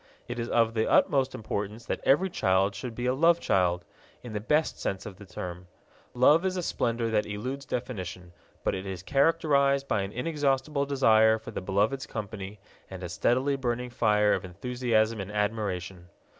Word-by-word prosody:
It 120 0 -5
is 115 - -3
of 115 -1 +2
the 110 -1 0
utmost 135 -2 +3
importance 105 +1 -4
that - - -2
every 180 +8 +3
child 95 - +2
should 115 +3 -6
be 120 - -3
a 125 - +2
love 165 +5 +4
child, 90 - +1 0.4
in 120 -3 -8
the 105 - -2
best 150 +9 +1
sense 95 - -3
of 100 -4 -8
the 100 -1 -13
term. 90 0 -7 0.5
Love 145 +7 +5
is 185 -1 -1
a 180 - -2
splendor 115 -6 -1
that 105 -1 +1
eludes 130 +7 -5
definition, 95 -8 -5 0.3
but - - +1
it 95 +1 -5
is 95 -1 -6
characterized 140 0 +2
by 100 - +1
an 95 +1 -4
inexhaustible 140 +1 0
desire 110 -5 +4
for 110 - -9
the - - -4
beloved's 105 +8 0
company 105 -2 -6 0.3
and 95 -1 -8
a 90 - -4
steadily 130 +11 +1
burning 125 -2 -2
fire 105 -3 +3
of 95 - -1
enthusiasm 110 +2 0
and 100 +1 -7
admiration. 95 -4 -2
110 Hz, 180 wpm, -28 LUFS, 100-135 Hz, 0.5 s, Love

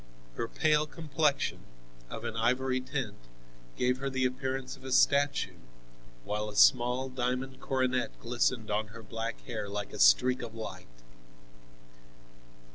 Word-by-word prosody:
Her 115 - -3
pale 150 +3 +2
complexion, 150 -2 0 0.5
of - - -6
an - - -4
ivory 130 +3 +1
tint, 130 -6 -4 0.6
gave 125 +1 +1
her 135 0 -2
the 130 -1 0
appearance 130 +1 -2
of - - -18
a 130 - -6
statue, 140 +2 +3 0.6
while 105 - -2
a 105 - -9
small 125 +4 +5
diamond 130 +1 -2
coronet 130 -2 -1
glistened 120 -2 0
on 105 +1 0
her 115 +2 -11
black 115 +2 -5
hair 110 -5 -4
like 100 0 -4
a - - -7
streak 90 - +5
of 115 -2 -7
light. 110 - -7
125 Hz, 135 wpm, -30 LUFS, 115-130 Hz, 0.6 s, small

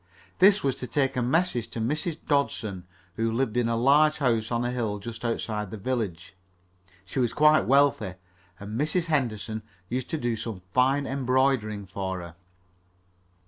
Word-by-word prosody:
This 195 +2 +6
was 135 -2 +1
to 125 - -5
take 135 +2 0
a 125 - 0
message 125 -2 +1
to - - -7
Mrs. 150 +7 -1
Dodson, 110 - -1 0.3
who 115 0 +1
lived 115 -1 -1
in 120 -1 +1
a 115 - +1
large 145 +6 +4
house 115 -5 +1
on 120 0 0
a 120 - -1
hill 115 -4 -2
just 115 +3 -8
outside 110 -3 -2
the 110 - -6
village. 100 -6 -3 0.7
She 95 - -4
was 120 -3 +1
quite 155 +1 +5
wealthy, 135 -8 +3 0.4
and 105 +5 -4
Mrs. 165 +3 0
Henderson 115 -8 -1 0.3
used 125 +1 -3
to 160 - -1
do 120 -5 -1
some 105 -4 -6
fine 135 +5 +3
embroidering 130 -6 +1
for 95 0 -4
her. 85 -1 -9
120 Hz, 165 wpm, -26 LUFS, 110-140 Hz, 0.7 s, This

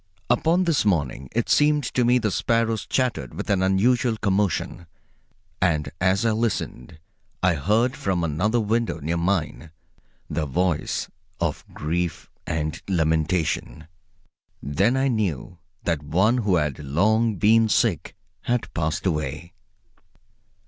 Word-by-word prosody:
Upon 170 +3 +3
this 165 -8 +2
morning 70 - -1
it 115 0 -1
seemed 150 0 +3
to 125 0 0
me 120 +1 +4
the 110 -4 0
sparrows 115 +1 0
chattered 105 - -1
with - - -3
an 95 -2 +2
unusual 110 +5 +2
commotion; 100 -4 -1 0.7
and 80 -5 +1
as 95 +3 +2
I 115 - +3
listened 110 - -3 0.5
I 90 -1 +4
heard 110 - +1
from 90 -3 -1
another 90 +10 +1
window 115 +2 0
near 80 +4 -2
mine 85 -4 -1 0.6
the 75 0 -2
voice 90 +4 -1 0.3
of - - -2
grief 85 +2 -3 0.2
and 80 0 -2
lamentation. 80 -2 0 0.7
Then 100 - +1
I 135 +1 +2
knew 95 - -2 0.2
that 85 -3 -1
one 95 +11 +2
who 105 -5 +2
had 75 -4 -1
long 105 +10 +1
been 110 +2 +4
sick - - +1 0.3
had 120 -1 -1
passed 75 0 -2
away. 75 0 -2
95 Hz, 130 wpm, -24 LUFS, 80-115 Hz, 0.7 s, me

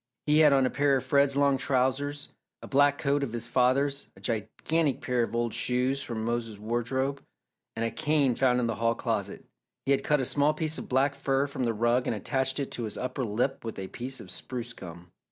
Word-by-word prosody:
He 150 +1 +4
had 150 -2 +7
on 135 -1 +4
a 130 - 0
pair 140 -1 +2
of 130 - -1
Fred's 140 -1 +3
long 140 -1 +3
trousers, 140 +2 0 0.3
a - - -7
black 145 +1 +3
coat 140 -1 +1
of 130 -5 -3
his 120 -1 -3
father's, 135 +3 +1
a - - -16
gigantic 130 +7 -1
pair 125 -1 0
of 115 - -2
old 120 -1 0
shoes 125 +2 0
from 110 -4 -4
Mose's 115 -2 -2
wardrobe, 125 +5 -2 0.5
and 115 +1 -1
a 115 - -1
cane 150 -4 +2
found 125 0 +2
in 125 - +1
the 115 -1 -2
hall 115 0 +1
closet. 105 -5 -3 0.4
He 135 - +1
had 140 - +2
cut 150 -1 +2
a 130 - 0
small 145 +3 +2
piece 160 -1 -1
of - - -8
black 135 +2 +2
fur 135 0 0
from 135 -3 -3
the 115 - +1
rug 120 +3 +1
and - - 0
attached 130 +6 0
it 140 - -3
to 120 - -4
his 105 - -4
upper 130 +1 -3
lip 120 +4 -1
with 115 -1 -6
a 95 -1 -5
piece 130 +2 -5
of 90 - -9
spruce 120 +3 -5
gum. 85 -3 -11
130 Hz, 225 wpm, -28 LUFS, 115-140 Hz, 0.5 s, had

